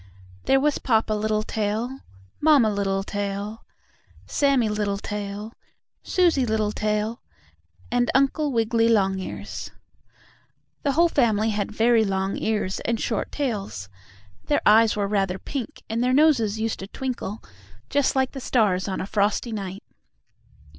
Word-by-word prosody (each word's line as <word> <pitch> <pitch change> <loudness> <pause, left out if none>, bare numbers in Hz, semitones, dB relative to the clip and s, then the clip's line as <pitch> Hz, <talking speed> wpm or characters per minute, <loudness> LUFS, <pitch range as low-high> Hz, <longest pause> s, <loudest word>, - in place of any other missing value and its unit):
There 270 - +4
was 295 +1 +1
Papa 225 -3 +1
Littletail, 215 +3 -1 0.4
Mamma 290 -8 +5
Littletail, 200 +1 -3 0.6
Sammie 275 -5 +2
Littletail, 205 +1 -3 0.5
Susie 345 -7 +2
Littletail 215 0 -1 0.7
and 245 0 +2
Uncle 275 +2 +2
Wiggily 230 -1 +2
Longears. 195 -4 -1 1.1
The 280 - 0
whole 340 +4 +5
family 225 -8 +2
had 205 -1 -2
very 225 +1 +3
long 195 -1 -1
ears 210 -3 -1
and 230 -1 -1
short - - -2
tails; 200 - -3 0.6
their 290 - +1
eyes 220 +1 +6
were 205 -1 0
rather 195 -2 0
pink 255 +4 -6
and 225 +2 -1
their 250 +1 +2
noses 260 -8 +3
used 225 0 -2
to 195 - -6
twinkle, 235 -3 -5 0.4
just 285 -1 +1
like 265 -1 +1
the 270 - -7
stars 205 -7 +1
on 190 - -2
a - - -3
frosty 205 +3 0
night. 195 -2 -5
220 Hz, 125 wpm, -24 LUFS, 205-250 Hz, 1.1 s, eyes